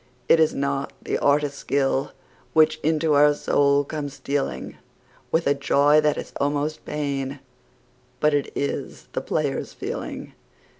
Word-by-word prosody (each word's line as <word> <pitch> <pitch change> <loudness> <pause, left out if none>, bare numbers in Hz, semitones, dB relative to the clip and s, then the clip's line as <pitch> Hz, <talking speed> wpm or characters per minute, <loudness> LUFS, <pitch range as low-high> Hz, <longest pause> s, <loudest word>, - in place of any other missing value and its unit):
It 165 - +5
is 160 -1 +3
not 140 0 -2
the - - -1
artist's 145 0 +1
skill 135 -1 0 0.4
which 155 0 +4
into 155 0 +1
our 145 +1 +5
soul 140 -1 +2
comes 145 -1 -5
stealing 135 - -3 0.5
With 165 +1 +2
a 140 - +4
joy 145 +2 +4
that 150 -1 +1
is - - -7
almost 145 +2 -1
pain, 140 -2 -3 0.8
but 150 0 +3
it 145 -1 0
is 140 - -4
the - - -1
player's - - -2
feeling. - - -6
145 Hz, 140 wpm, -24 LUFS, 140-150 Hz, 0.8 s, It